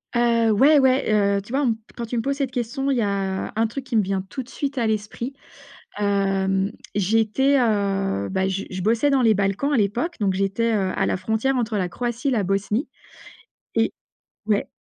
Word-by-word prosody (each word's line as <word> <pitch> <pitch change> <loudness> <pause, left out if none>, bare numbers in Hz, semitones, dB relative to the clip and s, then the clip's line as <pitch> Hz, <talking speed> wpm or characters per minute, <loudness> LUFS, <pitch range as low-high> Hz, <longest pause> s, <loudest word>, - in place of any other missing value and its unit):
Heu, 235 -1 +3
ouais, 280 +8 +6
ouais. 260 -3 +3 0.3
Heu, 200 - -2
tu 220 +5 -11
vois, 275 - +2
on 285 - +1
me 230 - +3
p 220 - -13 0.2
quand 235 - -4
tu 240 - -3
me 230 - +1
poses 275 0 -1
cette 275 -3 -1
question, 255 +3 -2
il 265 - +1
y - - +2
a 195 -2 -2
un 225 +1 +2
truc 265 +5 -6
qui 255 -2 -4
me 220 - +5
vient 195 -1 -2
tout 265 - -4
de 250 - -12
suite 280 -1 -4
à 230 - +1
l'esprit. 220 +4 -3 0.7
Hem, 195 -1 +1 0.2
j'étais, 225 +7 +2
heu, 195 - 0
bah, 190 0 0
je 195 +1 -2
je 185 - -4
bossais 225 +8 +2
dans 275 -2 +3
les 225 -2 +5
Balkans 200 +9 0
à - - +3
l'époque 235 - 0
donc 195 -2 +1
j'étais, 195 +4 0
heu, 190 -3 0
à - - +1
la - - 0
frontière 220 +8 0
entre 225 -3 -1
la 185 -2 -1
Croatie, 240 +7 -2
la 230 -5 +1
Bosnie. 200 - -1 0.9
Et - - +2 0.6
ouais, 210 -2 +1
220 Hz, 215 wpm, -23 LUFS, 195-255 Hz, 0.9 s, ouais